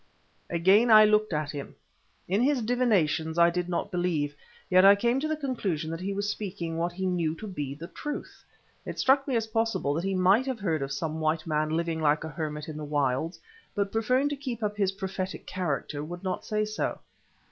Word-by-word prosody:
Again 190 +8 +4
I 215 -1 +9
looked 215 0 +3
at 150 -2 -1
him. 140 -2 -7 0.5
In 195 +5 +1
his 265 -2 +2
divinations 185 -10 +1
I 170 0 +6
did 180 0 -2
not 175 +3 -2
believe, 165 -5 -1 0.3
yet 185 0 +5
I 200 +1 +9
came 235 +5 +1
to 305 - -1
the 310 0 -1
conclusion 200 - -2
that 165 - -4
he 190 +2 -3
was 200 +1 -2
speaking 190 -5 -4
what 170 +1 0
he 190 +2 -4
knew 170 -4 0
to 215 - -8
be 145 -9 -4
the 160 +3 -8
truth. 295 +9 -7 0.4
It - - -6
struck 270 +1 +3
me 265 - 0
as 225 -1 +1
possible 225 -9 0
that 165 +4 -2
he 195 0 -1
might 195 +8 +4
have 260 -4 -2
heard 165 -7 0
of 135 0 -3
some 155 +3 -3
white 155 0 0
man 155 -1 0
living 165 0 -1
like 150 0 +2
a 160 - -5
hermit 150 -1 -4
in 155 -1 -6
the 155 - -5
wilds, 145 +2 -1 0.4
but 200 -1 0
preferring 250 +5 +2
to 290 - -2
keep 255 -5 -5
up 210 0 -1
his 200 -2 +1
prophetic 190 -1 -5
character 150 -5 -3
would 175 +4 -7
not 185 -1 -2
say 215 -1 0
so. 215 0 -2
185 Hz, 210 wpm, -28 LUFS, 160-215 Hz, 0.5 s, I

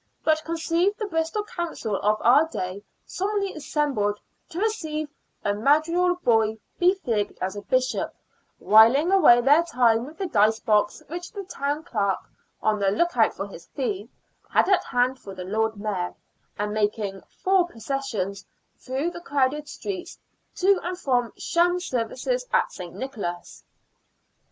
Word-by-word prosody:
But 315 0 +2
conceive 335 +5 0
the 430 - -3
Bristol 330 +2 -1
Council 340 - -4
of 210 +2 +1
our 280 +7 +5
day 190 - -5 0.2
solemnly 395 0 -2
assembled 275 -9 -1 0.3
to 340 - -9
receive 315 -9 -2 0.4
a 205 - +2
madrigal 315 - +2
boy 225 -9 +2 0.2
befigged 350 - +1
as 190 +2 -3
a 205 - -5
bishop, 255 +4 0 0.5
whiling 235 - +6
away 245 -11 +7
their 285 +6 +5
time 245 -7 +2
with 310 - -12
the 390 - -2
dice 220 - +3
box 210 -1 +1
which 350 +3 -6
the 400 -2 -6
Town 290 -4 -3
Clerk 205 - 0 0.3
— - - -45
on 215 -1 +2
the 200 -1 +2
look 345 - +1
out 225 -2 +3
for 195 - -4
his 170 -4 -12
fee 220 -5 -3 0.2
— - - -38
had - - +5
at 390 - +4
hand 250 +1 +1
for 195 -1 -10
the 180 -1 -6
Lord 220 +2 -1
Mayor, 200 -4 -3 0.4
and 210 0 -2
making 205 -2 -1 0.2
four 375 -2 +4
processions 225 - -4 0.4
through 270 +6 -2
the 345 - -9
crowded 290 -1 0
streets 375 -3 -6 0.4
to 385 0 +3
and 360 +1 -4
from 245 - 0
sham 350 +1 +2
services 355 - -2
at - - +2
St. 175 -2 -9
Nicholas 205 -10 -6
265 Hz, 155 wpm, -25 LUFS, 215-345 Hz, 0.5 s, away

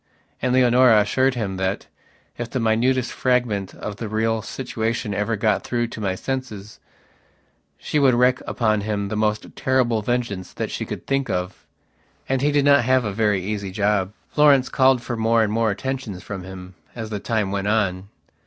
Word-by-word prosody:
And 125 - +1
Leonora 125 -2 +5
assured 130 +5 +2
him 100 -5 -3
that, 95 +1 -2 0.5
if 120 -1 -5
the 130 - -2
minutest 120 +3 +1
fragment 120 -7 0
of 105 -1 -6
the 110 -1 -5
real 110 +1 0
situation 115 -3 -3
ever 105 +3 -1
got 105 -1 +1
through 120 -1 -1
to 110 - -8
my 95 -2 -1
senses, 110 -4 -5 1.0
she 150 - -1
would 135 -3 +4
wreak 125 +1 +3
upon 110 -3 +1
him 100 -1 -2
the 110 - -3
most 105 0 -1
terrible 125 -4 +1
vengeance 115 -5 -2
that - - -4
she - - -3
could - - -6
think 135 -1 -1
of. 90 +1 -4 0.6
And 135 -1 0
he 145 +1 +2
did 145 -1 +2
not 140 -2 +5
have 130 0 +2
a 105 - -2
very 105 -3 +1
easy 100 0 -3
job. 100 0 0 0.2
Florence 145 -3 +4
called 130 -2 +3
for 120 - -3
more 115 0 +2
and 105 -1 -1
more 115 0 +2
attentions 110 -4 -4
from 100 -2 -6
him 95 0 -10 0.2
as 110 -2 -6
the 105 - -3
time 105 -3 -1
went 100 0 -2
on. 100 -3 0
110 Hz, 180 wpm, -22 LUFS, 100-125 Hz, 1.0 s, Leonora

